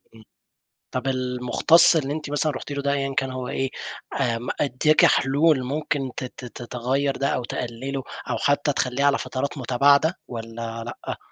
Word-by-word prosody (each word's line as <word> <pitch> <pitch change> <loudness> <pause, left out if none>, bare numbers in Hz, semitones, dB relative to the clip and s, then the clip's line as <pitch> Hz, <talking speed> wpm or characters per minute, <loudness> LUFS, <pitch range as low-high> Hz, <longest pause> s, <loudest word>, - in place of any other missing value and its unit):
إمم. 110 - -15 0.7
طَب 130 +1 -3
المُختص 130 +6 +4
اللي 145 -2 0
أنتِ 150 -2 -5
مثلًا 145 +1 +1
رُحتِ 140 +1 -7
له 140 0 -2
ده 140 - +1
أيًّا 135 -1 -1
كان 135 -1 +1
هو 130 -1 -4
إيه، 135 0 -1 0.5
آمم، 120 -1 -1
ادّاكِ 150 +3 +4
حلول 140 +1 +3
ممكن 140 0 -2
ت - - -3
ت 125 -1 -9
تغيَّر 130 +4 -1
ده 140 - 0
أو 125 - 0
تقلله 125 +3 -4 0.3
أو - - 0
حتى 145 0 +2
تخلّيه 130 +2 0
على 140 0 +4
فترات 140 +2 -3
متباعدة 140 +6 +3
والّا 115 -1 -6
لأ؟ 120 - -6
135 Hz, 165 wpm, -24 LUFS, 125-145 Hz, 0.7 s, المُختص